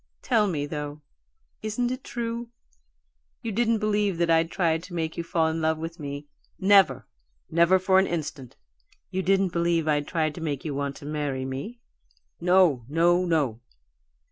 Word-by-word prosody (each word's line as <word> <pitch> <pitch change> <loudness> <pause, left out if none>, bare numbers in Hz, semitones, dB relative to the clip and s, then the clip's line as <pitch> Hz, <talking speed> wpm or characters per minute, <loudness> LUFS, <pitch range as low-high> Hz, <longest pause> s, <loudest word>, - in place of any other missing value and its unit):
Tell 210 -2 +3
me, 150 -6 -1
though, 150 0 -6 0.6
isn't 230 +3 -1
it 255 - -5
true? 235 0 -4 0.9
You 225 - -2
didn't 230 +2 +2
believe 210 -3 0
that 170 -1 +2
I'd 165 0 +3
tried 165 -3 +1
to 180 - -9
make 160 -1 -2
you 170 - -3
fall 165 -1 +1
in 160 0 -2
love 160 0 +1
with 165 +1 -6
me 145 0 -6 0.2
" - - -39
"Never! 195 -2 +5 0.5
Never 170 +3 +5
for 190 0 +4
an 190 - +2
instant!" 150 -6 -5 0.6
"You 190 0 -1
didn't 190 -1 +2
believe 170 -1 +1
I'd 145 -1 +1
tried 155 -3 0
to 170 - -9
make 145 -3 -3
you 150 - -2
want 140 0 -2
to - - -11
marry 145 -3 -2
me 140 - -6 0.3
" - - -35 0.3
"No, 180 -8 +4
no, 175 +3 +3
no!" 145 -10 0
165 Hz, 175 wpm, -26 LUFS, 150-190 Hz, 0.9 s, Never